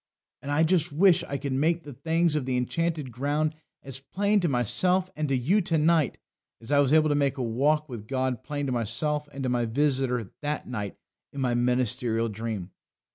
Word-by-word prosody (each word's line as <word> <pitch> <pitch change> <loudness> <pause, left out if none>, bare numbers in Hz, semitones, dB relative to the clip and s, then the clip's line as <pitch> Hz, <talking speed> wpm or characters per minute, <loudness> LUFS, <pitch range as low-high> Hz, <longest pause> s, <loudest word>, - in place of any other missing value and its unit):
And 140 - -7
I 145 +2 +3
just 165 -1 +2
wish 175 +3 +4
I 140 - -3
could 140 0 -3
make 165 +5 +1
the 145 - -9
things 160 +4 +1
of 140 -4 -1
the 130 -1 0
Enchanted 155 +2 -1
Ground 145 +5 -1 0.3
as 135 -1 -7
plain 200 +8 +1
to 175 - +1
myself 180 - +1
and 150 -1 -2
to 135 - +2
you 175 - +2
to 165 -2 0
night 160 -2 +2 0.4
as 115 +4 -9
I 145 - +5
was 140 -2 +3
able 155 0 +5
to - - +3
make 140 -2 +1
a 130 - -2
walk 145 +7 +1
with 115 -6 -8
God 130 -2 -1
plain 145 -1 -4
to 135 - -2
myself 130 +6 -1
and 135 -1 -6
to 130 - 0
my 120 -1 +1
visitor 130 -3 0
that 150 0 -3
night 105 -5 -5 0.3
in 140 - -7
my 125 -2 +1
ministerial 120 -1 +1
dream. 105 -4 -5
140 Hz, 205 wpm, -27 LUFS, 125-155 Hz, 0.4 s, I